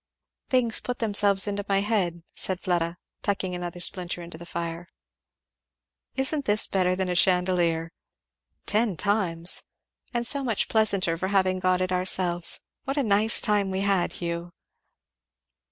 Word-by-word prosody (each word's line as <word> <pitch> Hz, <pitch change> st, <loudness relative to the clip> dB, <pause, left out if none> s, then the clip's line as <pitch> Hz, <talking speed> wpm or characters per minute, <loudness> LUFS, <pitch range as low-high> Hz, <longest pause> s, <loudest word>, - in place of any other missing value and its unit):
"Things 245 Hz, -4 st, +3 dB
put 250 Hz, 0 st, -4 dB
themselves 205 Hz, -3 st, +3 dB
in 205 Hz, -1 st, -3 dB
my 195 Hz, 0 st, +2 dB
head," 185 Hz, -6 st, -1 dB
said 185 Hz, -1 st, -2 dB
Fleda, 175 Hz, -2 st, -1 dB, 0.2 s
tucking 195 Hz, -2 st, -2 dB
another 175 Hz, 0 st, -5 dB
splinter 175 Hz, -1 st, -2 dB
into 170 Hz, -1 st, -10 dB
the 170 Hz, -, -10 dB
fire. 170 Hz, 0 st, -5 dB, 1.3 s
"Isn't 270 Hz, +2 st, +1 dB
this 210 Hz, +1 st, +4 dB
better 185 Hz, -1 st, +1 dB
than 190 Hz, 0 st, -1 dB
a 180 Hz, -, -1 dB
chandelier?" 175 Hz, -2 st, +2 dB, 0.7 s
"Ten 210 Hz, -3 st, +1 dB
times!" 180 Hz, -4 st, +1 dB, 0.5 s
"And 240 Hz, 0 st, -1 dB
so 280 Hz, +3 st, +2 dB
much 230 Hz, -5 st, -1 dB
pleasanter 195 Hz, -6 st, +3 dB
for 190 Hz, -, -1 dB
having 190 Hz, -1 st, +1 dB
got 185 Hz, 0 st, +1 dB
it 185 Hz, 0 st, -1 dB
ourselves. 180 Hz, -1 st, 0 dB, 0.2 s
What 275 Hz, +2 st, -3 dB
a 285 Hz, -, +2 dB
nice 215 Hz, 0 st, +4 dB
time 205 Hz, -3 st, +1 dB
we 190 Hz, 0 st, -2 dB
had, 195 Hz, -3 st, +1 dB
Hugh?" 170 Hz, 0 st, -5 dB
185 Hz, 145 wpm, -26 LUFS, 175-210 Hz, 1.3 s, this